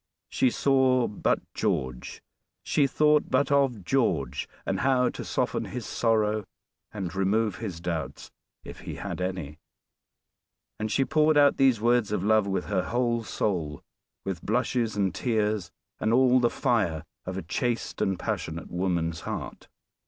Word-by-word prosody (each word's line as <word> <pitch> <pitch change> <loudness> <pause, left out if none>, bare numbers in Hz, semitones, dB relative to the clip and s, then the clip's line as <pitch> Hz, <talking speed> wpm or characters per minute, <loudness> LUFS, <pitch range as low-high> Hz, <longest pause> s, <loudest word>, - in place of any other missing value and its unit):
She 130 - +2
saw 130 -1 +3
but 105 - 0
George 65 -1 -2 0.4
she 145 -2 +2
thought 150 +2 +3
but 140 - +2
of 135 -7 +2
George 85 - 0 0.2
and - - -1
how 130 -2 +3
to - - -6
soften - - -1
his 125 -4 -6
sorrow, 110 -2 +1 0.5
and 95 -5 -5
remove 100 +1 +1
his 95 -7 -5
doubts, 85 -4 -4 0.3
if - - -10
he - - -7
had - - -5
any. 85 -5 -4 1.2
And 110 0 -2
she 135 - +2
poured 155 +1 +3
out 145 -1 +5
these 130 -4 +4
words 120 -1 +2
of 100 -3 -1
love 110 -1 +3
with 95 -1 -1
her 95 - -1
whole 120 -1 0
soul 85 -9 -2 0.4
with 95 -3 -3
blushes 120 0 0
and 95 -3 +1
tears 105 -4 0 0.3
and 110 - +1
all 130 +1 +5
the 120 -1 +3
fire 105 - 0 0.2
of 95 0 -3
a 95 - -4
chaste 120 +8 -2
and 95 -1 +1
passionate 80 0 -4
woman's 85 -2 -1
heart. - - -6
110 Hz, 150 wpm, -27 LUFS, 90-125 Hz, 1.2 s, out